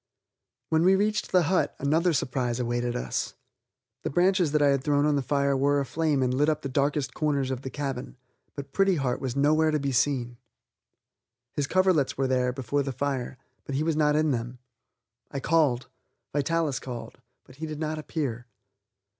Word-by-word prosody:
When 160 +1 +3
we 190 +2 +6
reached 210 +2 0
the 180 -1 +4
hut 180 +3 +1
another 160 +5 +2
surprise 125 -4 -1
awaited 120 0 -1
us. 60 0 -3 0.7
The - - -2
branches 180 0 +2
that 150 0 +2
I 145 - +5
had 140 -1 +1
thrown 145 0 +2
on 150 -1 +3
the 140 - +1
fire 140 +1 +1
were 140 +2 +2
aflame 145 0 0
and 125 0 +1
lit 145 +4 +2
up 155 0 -1
the 140 - -3
darkest 140 +1 0
corners 140 -4 0
of 130 -1 -3
the 130 - -5
cabin, 135 -1 -5 0.4
but 140 -1 -8
Pretty 195 -1 +3
Heart 135 -5 -1
was 130 -2 -3
nowhere 155 +3 +3
to 155 -1 +1
be 140 -1 -1
seen. 125 -2 0 1.2
His 145 -1 -1
coverlets 185 -6 +2
were 135 - +1
there 125 -1 +1
before 135 +2 -1
the 135 0 -3
fire, 135 -1 -3 0.3
but 140 - -5
he 145 - +1
was 160 -1 0
not 150 -1 +3
in 155 0 +2
them. 120 0 -3 0.7
I 140 - -4
called. 140 -4 +2 0.5
Vitalis 150 -1 0
called, 125 -3 -8 0.2
but 130 - -18
he 160 +1 -5
did 155 -1 -6
not 155 0 -2
appear. 130 -6 -4
140 Hz, 185 wpm, -27 LUFS, 130-155 Hz, 1.2 s, we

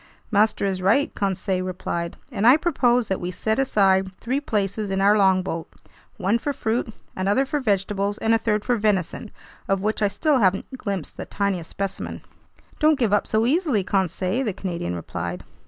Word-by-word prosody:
"Master 215 0 +2
is 190 -2 -1
right," 220 +10 +2
Conseil 190 -1 -1
replied, 175 -2 -4
"and 220 -1 +1
I 260 +4 +8
propose 250 - +2
that 190 - -2
we 175 - -3
set 220 +5 -1
aside 195 -7 +3
three 260 +8 -2
places 205 -4 -1
in 195 0 -1
our 200 +2 +5
longboat: 185 -4 +1 0.5
one 200 +4 +1
for 285 +4 -2
fruit, 230 -1 -1 0.2
another 200 +8 +1
for 295 +2 -1
vegetables, 200 -3 0
and 225 0 +1
a 225 - +3
third 215 -2 0
for 245 -1 +2
venison, 210 0 0 0.4
of 195 0 0
which 215 +1 -1
I 205 - +4
still 290 +6 +1
haven't 195 +5 +1
glimpsed 200 - -4
the - - -5
tiniest 195 -5 -2
specimen." 195 -1 -5 0.6
"Don't 305 -1 +4
give 230 -6 +1
up 205 - +2
so 220 +1 +1
easily, 280 - +2
Conseil," 190 - 0
the 215 -6 -1
Canadian 170 - -4
replied. 85 +1 -5
205 Hz, 175 wpm, -23 LUFS, 190-230 Hz, 0.6 s, I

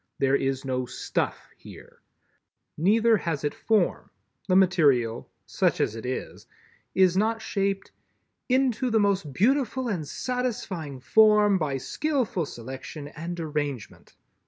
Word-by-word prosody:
There 135 0 +2
is 135 -1 -1
no 130 -1 -2
"stuff" - - -3
here. - - -14 0.7
Neither 220 +6 +3
has 165 -7 -3
it 145 - -1
Form. 220 -2 0 0.4
The 185 - +2
material—such 145 -11 +2
as 110 - 0
it 115 +2 -6
is—is 180 +7 -2
not 225 +3 +1
shaped 195 -3 -2 0.6
"into 255 -1 +2
the 225 -1 +3
most 195 -7 +1
beautiful 255 - +1
and 175 -9 -3
satisfying 205 - -4
form 210 +2 +5
by 145 -4 -1
skillful 245 - -1
selection 135 +5 -8
and 170 +3 -6
arrangement." 145 -6 -5
180 Hz, 115 wpm, -26 LUFS, 140-220 Hz, 0.7 s, form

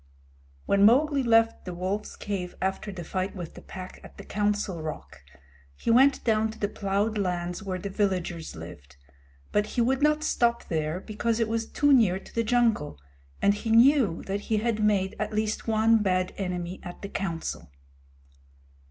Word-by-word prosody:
When 200 - +2
Mowgli 275 +6 +5
left 225 -2 +3
the 180 -2 -6
wolf's 190 +4 -3
cave 185 -3 -4
after 190 +2 -2
the 180 -3 -7
fight 185 +4 -3
with 175 -4 -7
the - - -11
Pack 185 0 -9
at - - -14
the - - -9
Council 205 -4 -1
Rock, 155 - -7 0.5
he 230 - -1
went 265 +4 +5
down 220 -1 +2
to 220 - -9
the 205 - -1
plowed 205 +2 -1
lands 180 -1 -2
where 190 -3 -3
the 195 +2 -6
villagers 180 -5 -2
lived, 80 -5 -11 0.5
but 210 0 +1
he - - +4
would 260 +3 +1
not 300 +1 +3
stop 235 -5 +1
there 155 +1 -1
because 220 +3 -2
it 230 - +1
was 225 0 -2
too 290 -1 +3
near 215 -8 +4
to 195 - -13
the 230 - +1
jungle, 225 - +1 0.5
and 200 - +5
he 215 +2 -5
knew 230 - +4
that 195 +1 -3
he 215 +1 -1
had 220 0 0
made 200 -1 +1
at 215 0 -2
least 215 +1 -1
one 225 0 +4
bad 185 -2 0
enemy 180 -1 -4
at 175 +2 -10
the 200 - -5
Council. 170 - -4
205 Hz, 180 wpm, -27 LUFS, 185-225 Hz, 0.5 s, Mowgli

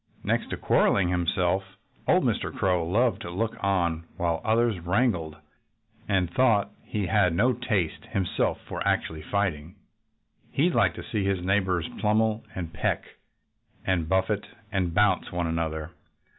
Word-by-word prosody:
Next - - 0
to - - -3
quarreling 90 -3 +3
himself, 90 +2 0 0.3
old - - +4
Mr. - - 0
Crow 90 -3 +1
loved 115 +7 +2
to - - -6
look 110 +6 -2
on 85 -4 +1
while 85 -2 0
others 110 -2 +2
wrangled. 90 -3 0 0.7
And 95 -3 +2
though 110 -1 +3
he 105 -2 -2
had 90 -2 +3
no 120 +8 +3
taste 105 -9 -1
himself 95 -3 0
for - - -5
actual 80 -1 0
fighting, 90 -3 -2 0.7
he 165 +6 +2
liked 100 - +2
to - - -7
see 105 -3 -2
his 95 -2 -1
neighbors 95 -3 +1
pummel 110 +1 +2
and 85 -3 -5
peck - - 0 0.8
and 85 -4 0
buffet 95 +3 +1 0.2
and 95 -4 0
bounce 105 -2 +3
one 85 0 -1
another. 80 -1 -2
95 Hz, 145 wpm, -27 LUFS, 85-105 Hz, 0.8 s, old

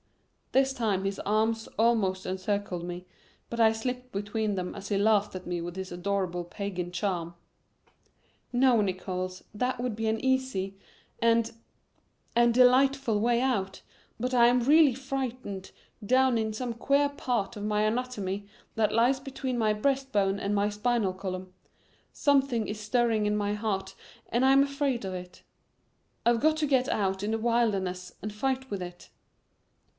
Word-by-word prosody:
This 270 0 +3
time 205 -6 0
his 195 0 -2
arms 220 +2 0
almost 215 -5 +2
encircled 185 -1 -2
me, 175 +1 -6 0.5
but 235 - -4
I 225 -1 +6
slipped 250 +3 -4
between 205 +1 -2
them 180 -1 -3
as 200 0 -7
he 205 - +1
laughed 210 0 +3
at 185 - -6
me 175 -1 -3
with 175 +1 -6
his 190 0 -6
adorable 180 -1 -2
pagan 180 -1 -5
charm. 175 -2 -2 1.2
"No, 245 -2 +4
Nickols, 185 -1 -3
that 250 +3 -1
would 245 -3 -2
be 225 +1 -2
an 220 0 +1
easy 260 -8 0 0.5
and 230 0 +3 0.8
and 235 0 +5
delightful 255 -2 +4
way 235 +1 +3
out, 205 -8 -1 0.4
but 250 +2 -2
I 235 -1 +6
am 245 +1 +3
really 290 0 +5
frightened 255 -7 -4 0.3
down 255 +2 +3
in 220 -1 -1
some 235 +2 -3
queer 280 +5 +2
part 245 -7 -2
of 205 - -6
my 210 0 +1
anatomy 215 -4 -2 0.3
that 215 -1 +2
lies 240 +4 +3
between 265 -2 -4
my 220 -2 +2
breast 270 +5 0
bone 195 -2 +2
and 200 +1 -1
my 205 0 +2
spinal 210 -1 0
column. 185 -1 -6 0.6
Something 270 -6 +2
is 210 0 -5
stirring 220 0 +1
in 210 0 +1
my 205 0 0
heart 210 -2 -2 0.4
and 240 +2 +1
I'm 270 +1 +6
afraid 275 -5 -1
of 190 - -4
it. 180 0 -9 0.8
I've 235 -1 +3
got 310 +1 +3
to 310 - +1
get 265 -2 +2
out 190 -2 0
in 215 +2 0
a - - 0
wilderness 200 -6 0
and 210 0 -4
fight 265 +4 -2
with 200 -2 -3
it." 175 0 -9
220 Hz, 160 wpm, -28 LUFS, 195-250 Hz, 1.2 s, I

